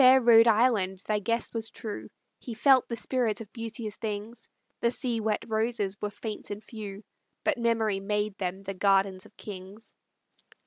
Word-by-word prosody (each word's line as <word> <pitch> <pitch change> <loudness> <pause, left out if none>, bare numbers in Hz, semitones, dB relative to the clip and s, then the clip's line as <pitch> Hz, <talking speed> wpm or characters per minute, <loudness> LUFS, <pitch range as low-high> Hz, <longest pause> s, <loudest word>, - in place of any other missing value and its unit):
O - - +7
fair 260 +1 +9
Rhode 230 -2 +7
Island, 215 -4 +3
thy 215 -1 +1
guest 230 +3 -1
was 225 -1 -1
true, 215 -2 -6 0.3
He 235 - -7
felt 260 +2 +5
the 235 - -3
spirit 240 -2 0
of 220 -3 -10
beauteous 230 -2 -4
things; 220 +1 -5 0.3
The 235 - +3
sea 240 -1 0
wet 215 -1 -1
roses 220 -3 0
were 210 - -1
faint 210 +1 -5
and 205 +1 -6
few, 210 -2 -8 0.4
But 300 -5 +1
memory 225 -4 +1
made 210 +1 -1
them 190 +1 -3
the 195 0 -4
gardens 195 -1 +2
of - - -26
kings. 200 +2 -9
220 Hz, 175 wpm, -28 LUFS, 205-230 Hz, 0.4 s, fair